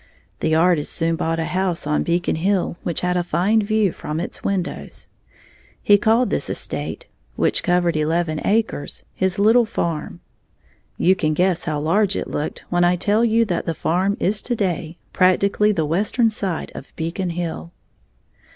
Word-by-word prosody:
The 160 0 +1
artist 165 -2 +2
soon 165 0 +1
bought 165 0 -1
a 165 - -1
house 185 -2 -1
on 150 0 +1
Beacon 170 -1 0
Hill 185 +1 0
which 170 - -3
had 180 0 0
a 175 - +1
fine 200 +6 +2
view 215 -2 +1
from 155 0 -5
its 175 - -6
windows. 190 -3 -3 0.7
He 205 0 +5
called 230 +3 +2
this - - -1
estate, - - -4 0.3
which - - +1
covered 175 -1 +1
eleven 155 +1 0
acres, 220 -8 -1
his 190 -1 -1
"little 225 +3 +4
farm." 170 -7 -3 0.8
You 185 +2 +4
can 155 -4 0
guess 180 0 +1
how 150 -1 -1
large 195 +6 +2
it - - -3
looked 150 - -4
when 175 0 +2
I 175 +1 +4
tell 210 +5 +1
you 230 0 +3
that 175 -5 -2
the 165 - -1
farm 185 +7 0
is 205 +2 +1
to 245 - -2
day 175 -5 -2 0.2
practically 200 +3 +3
the 165 -6 0
western 210 +8 +1
side 195 -6 -3
of - - -10
Beacon 170 +3 -3
Hill. 170 0 -4
180 Hz, 170 wpm, -21 LUFS, 165-205 Hz, 0.8 s, He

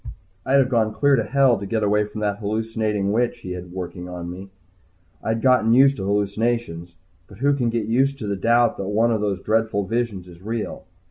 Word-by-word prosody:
I'd 130 - +1
have 135 -2 +4
gone 110 -4 +1
clear 140 -1 +4
to 115 - +1
Hell 130 0 +3
to 100 - -6
get 110 +1 -1
away 105 +1 +2
from 105 +1 -8
that 105 -1 -1
hallucinating 110 -1 -1
witch 120 +3 0
he 90 - -7
had 90 -1 -7
working 90 -1 -6
on 90 -1 -6
me. 95 +2 -9 0.7
I'd 110 0 -1
gotten 125 -4 +4
used 135 +1 +5
to 95 - -4
hallucinations 100 -4 -1 0.3
but 100 - -14
who 140 +5 +2
can 125 -4 0
get 115 -2 -1
used 135 +5 +1
to 115 - -6
the 100 - -1
doubt 115 +4 +2
that 95 - -4
one 110 +3 +2
of 110 -2 0
those 100 -2 -1
dreadful 110 -2 0
visions 110 -4 -2
is 85 0 -14
real? 110 +2 -5
110 Hz, 210 wpm, -22 LUFS, 100-120 Hz, 0.7 s, used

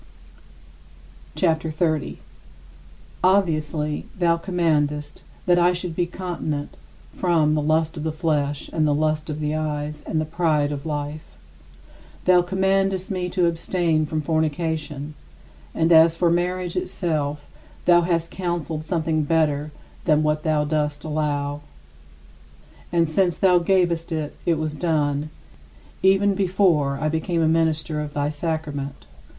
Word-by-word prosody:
CHAPTER 160 -2 +1
XXX - - -5
41. 155 -2 0 1.1
Obviously 155 -5 +1
thou 170 -2 +3
commandest 155 -5 -1 0.2
that 175 -1 +4
I 175 +1 +4
should 175 -2 -4
be 175 0 0
continent 170 -5 -4 0.4
from 165 -4 +2
"the 155 - +1
lust 160 +1 +1
of 150 - -4
the 160 - -1
flesh, 150 -3 -1
and 155 -2 +2
the 145 - +2
lust 155 +1 0
of 150 0 -4
the 150 0 -1
eyes, 150 -1 -3
and 160 - 0
the 155 - 0
pride 155 -3 +1
of 145 +1 -5
life." 145 - -5 0.9
Thou 180 -1 +6
commandest 190 +1 0
me 180 -2 -2
to 180 0 +1
abstain 165 -2 0
from 155 0 -2
fornication, 155 -2 -2 0.6
and 160 +1 +2
as 165 0 +6
for 170 -1 +3
marriage 180 0 -1
itself, 150 -4 -2 0.4
thou 175 -1 +6
hast 170 -1 -1
counseled 170 -4 -3
something 160 -1 0
better 150 -1 +1 0.3
than 155 0 +3
what 150 0 +1
thou 155 -1 +1
dost 150 -1 -1
allow. 145 -2 -2 1.3
And 170 -1 +2
since 175 +2 +1
thou 180 -2 +4
gavest 170 -2 +1
it, 155 -2 -3
it 165 -2 +3
was 155 -1 -2
done 150 -2 0 0.7
even 195 +1 +4
before 180 -7 +2
I 155 - 0
became 160 +2 0
a - - +3
minister 160 -1 +1
of 150 0 -6
thy 145 0 0
sacrament. 145 - -4
160 Hz, 135 wpm, -23 LUFS, 150-175 Hz, 1.3 s, Thou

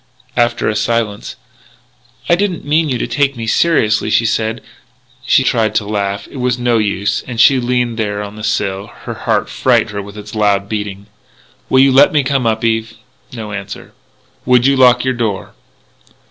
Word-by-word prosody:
After 120 -1 +1
a 105 - 0
silence: 110 -1 -2 0.9
"I - - +3
didn't 185 -1 -1
mean 155 +1 +1
you 130 - 0
to - - -2
take 135 +2 0
me 115 - -4
seriously," 110 -5 +2
she 110 +2 +2
said. 110 +1 -1 0.7
She 135 - +4
tried 110 -4 0
to 105 - +1
laugh. 100 -1 -3
It - - -9
was 125 -1 0
no 120 -2 +1
use. 100 -1 -1
And, 125 - -6
as 115 - +2
she 135 0 +5
leaned 120 -2 -1
there 105 -1 -2
on 100 0 -8
the 105 - -9
sill, 100 -2 -2 0.2
her - - -4
heart - - -1
frightened - - +1
her 100 0 -4
with 100 +1 -11
its 105 0 -10
loud 100 -2 +1
beating. 105 -2 -5 0.6
"Will 130 - +5
you 135 0 +5
let 135 +2 +6
me 150 -2 +3
come 130 -2 0
up, 110 0 -1
Eve?" 115 0 -1 0.4
No 110 -4 -7
answer. 100 -1 -8 0.5
"Would 125 -1 +3
you 140 0 +4
lock 125 -1 +4
your 130 - +1
door?" 110 -5 -3
115 Hz, 190 wpm, -15 LUFS, 105-125 Hz, 0.9 s, let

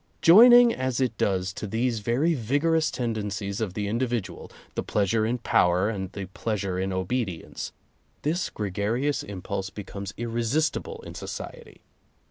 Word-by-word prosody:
Joining 240 +6 +9
as 130 -1 -2
it 125 -4 0
does 95 -1 0
to 105 - -5
these 115 +2 0
very 125 +10 +1
vigorous 150 +5 +1
ten 120 -3 -2
dencies 100 -1 -3
of 95 -4 -3
the 105 -1 -2
individual 120 0 -2
— - - -29
the - - -2
pleasure 110 +2 +1
in 120 +2 0
power 90 -4 +2
and 95 -4 -5
the 100 - -5
pleasure 95 -1 -3
in 95 +1 -1
obedience 95 -1 -3 0.3
— - - -40
this 165 +5 0
gregarious 110 +8 -1
impulse 95 0 -5
becomes 100 0 -7
irresistible 140 - -1
in - - -8
society. 470 -3 -8
110 Hz, 150 wpm, -26 LUFS, 100-130 Hz, 0.3 s, Joining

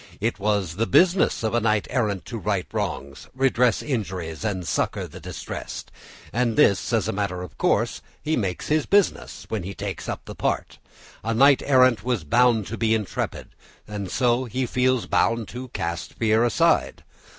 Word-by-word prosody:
It 115 +1 -1
was 100 -4 0
the 115 - +1
business 175 - +3
of 110 - 0
a 120 - +3
knight 105 -2 +1
errant 105 -7 -1
to 115 - -5
right 100 -3 -1
wrongs, 70 0 -4
redress 125 -4 +2
injuries, 95 - -3
and 95 -5 -2
succour - - -1
the - - -11
distressed, - - -7 0.4
and 120 -1 +1
this, 100 +1 +3
as 115 -4 +1
a - - 0
matter 95 -3 -2
of 90 - -10
course, - - +1 0.2
he 155 +1 -1
makes 95 -6 -2
his 155 0 +1
business 200 -1 +1
when 110 -3 -2
he 95 +2 -6
takes - - -5
up - - -5
the - - -7
part; - - -2 0.4
a 115 +1 -1
knight 140 +3 +6
errant 130 -4 +4
was 120 -7 -1
bound 120 +5 +3
to 115 +3 -6
be 110 0 +3
intrepid, 105 -4 -3 0.4
and 100 -3 -5
so 125 +2 +1
he 125 +2 -2
feels 125 0 +1
bound 115 -1 +1
to 125 +4 -7
cast 85 -7 -4
fear 110 0 +2
aside. 120 - +2
110 Hz, 175 wpm, -24 LUFS, 100-125 Hz, 0.4 s, knight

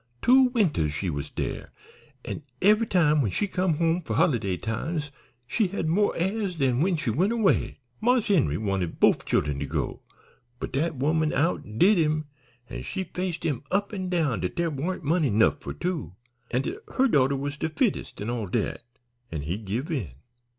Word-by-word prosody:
Two 260 - +6
winters 180 - +1
she 90 +3 -2
was 70 -1 -4
dere, - - -4 0.6
an' - - -4 0.2
eve'y 215 +4 +4
time 155 -5 +4
when 110 - +1
she 205 - -1
come 185 -3 0
home 165 +2 +1
for 115 -10 -4
holiday 100 -8 +2
times 145 - -3 0.3
she 215 - +1
had 180 -3 -3
mo' 200 +6 +3
airs 195 +1 -1
dan 135 -4 +1
when 180 0 +2
she 130 -6 -1
went 185 - +2
away. 225 -4 +1 0.2
Marse 245 -1 +2
Henry 140 - +3
wanted 95 -5 -2
bofe - - +4
chillen 75 -1 0
to 70 - -3
go, - - -3 0.6
but - - -4
dat 155 +4 0
woman 155 +4 +1
outdid 165 - +2
him, 155 -1 +1 0.4
an' - - -6
she 190 - -3
faced 180 -1 -4
him 145 -7 -1
up 200 +2 0
an' 185 -2 -3
down 155 - +1
dat 90 +1 -3
dere 170 -1 0
warn't 165 +6 -3
money 155 -1 +2
'nough 110 +1 +3
for - - -5
two, 170 - -3 0.3
an' 125 +2 0
dat - - -3 0.2
her 265 - +5
daughter 140 - +3
was 140 +1 -3
de 160 +1 -2
fittenest, 210 - -1
an' 105 +3 -3
all 115 -4 -3
dat, 105 +4 -1 0.5
an' 80 -3 -4
he 80 +5 -2
give 110 - -4
in. 130 - -2
155 Hz, 185 wpm, -26 LUFS, 115-185 Hz, 0.6 s, Two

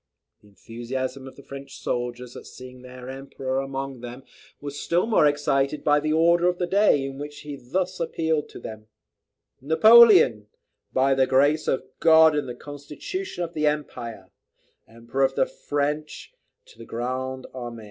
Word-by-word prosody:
The 105 - -21
enthusiasm 125 +6 -6
of 135 - -12
the 140 - -14
French 140 -1 -10
soldiers 125 0 -4
at - - -10
seeing 130 0 -12
their 125 0 -11
Emperor 135 0 -4
among 135 -1 -5
them, 125 +2 -9 0.4
was 145 0 -7
still 175 +4 +1
more 220 -9 +4
excited 145 0 0
by 150 -1 +4
the 155 +1 -2
"Order 170 +2 +3
of 180 0 +1
the 180 - -1
day," 190 -7 +3
in 135 0 -7
which 145 0 -8
he 145 -1 -7
thus 180 +9 -3
appealed 160 -2 -1
to - - -11
them: 110 -1 -9 0.7
"Napoleon, 160 - +6 0.4
by 135 +1 +2
the 130 -1 +2
Grace 145 +4 +2
of 130 - 0
God, 160 -1 +6
and 145 -3 -2
the 120 - -6
Constitution 150 - -6
of 170 0 -6
the 155 -1 0
Empire, 120 -9 -4 0.6
Emperor 115 +4 -5
of 135 - +1
the - - +3
French, 150 - -4 0.3
&c. - - -19
to - - -21
the - - -10
Grand 130 +2 -4
Army. 120 -2 -7
135 Hz, 170 wpm, -24 LUFS, 130-155 Hz, 0.7 s, Napoleon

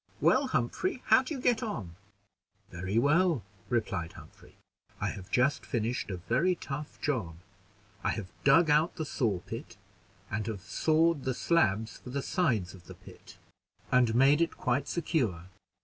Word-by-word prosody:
"Well, - - +3
Humphrey 375 -9 -1
how 260 - +6
do 285 +4 -5
you - - -5
get 245 -2 +2
on?" 110 - -5 0.8
"Very 90 +4 -3
well," 150 - +3 0.3
replied 105 -9 -1
Humphrey. - - -15 0.4
"I - - -1
have 95 -1 -8
just 130 +5 +2
finished 120 -2 -2
a 95 - -3
very 130 - +1
tough 145 -2 -7
job. 110 - -1 0.7
I - - +1
have 100 -5 -4
dug 150 +3 +5
out 155 +4 +3
the 160 -3 -3
saw 110 -11 -1
pit, - - -8 0.5
and 105 +1 -2
have 105 -4 -4
sawed 160 - +2
the 130 -1 -1
slabs 110 - +1
for - - -11
the 135 +2 -3
sides 115 - 0
of 90 -3 -15
the - - -10
pit, - - -15 0.5
and 125 -3 +4
made 140 +5 +5
it 165 - 0
quite 135 +1 0
secure. 115 - -1
130 Hz, 160 wpm, -30 LUFS, 105-160 Hz, 0.8 s, how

